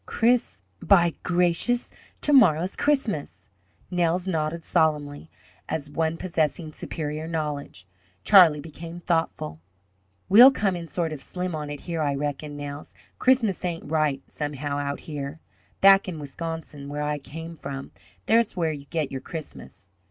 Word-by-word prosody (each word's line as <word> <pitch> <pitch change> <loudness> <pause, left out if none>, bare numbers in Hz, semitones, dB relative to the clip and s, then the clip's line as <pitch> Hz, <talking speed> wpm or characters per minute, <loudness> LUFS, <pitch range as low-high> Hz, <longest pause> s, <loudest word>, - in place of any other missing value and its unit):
"Chris 225 - +1 0.2
By 175 -4 +4
gracious! 180 +7 +1 0.3
to 295 - +2
morrow's 185 - +5
Christmas!" 290 -2 -1 0.4
Nels 175 0 +1
nodded 165 -2 -2
solemnly, 150 -1 0 0.4
as 145 -2 -3
one 160 +1 -1
possessing 160 -2 -1
superior 155 +1 -5
knowledge. 150 - -4 0.4
Charlie 175 -7 +7
became 165 +2 -9
thoughtful. 165 - -1 0.7
"We'll 240 +7 +10
come 200 -8 0
in 170 -1 -6
sort 165 0 -2
of 145 - -7
slim 180 -2 -4
on 150 -1 -5
it 145 -1 -6
here, 165 -2 -3
I 145 -2 0
reckon, 145 +1 -4
Nels. 145 0 -7 0.2
Christmas 240 -8 +2
ain't 170 -4 -4
right, 150 -4 +1
somehow, 145 -1 -4
out 140 0 -3
here. 145 0 -6 0.4
Back 195 0 +7
in 175 -3 -4
Wisconsin, 150 -1 -6
where 145 +1 -3
I 150 0 -1
came 165 +4 -8
from, 140 -2 -7 0.3
there's 225 -3 +2
where 165 -2 +1
you 145 -2 -7
get 155 -1 -2
your 135 - -4
Christmas!" 160 -3 -9
160 Hz, 145 wpm, -25 LUFS, 145-175 Hz, 0.7 s, We'll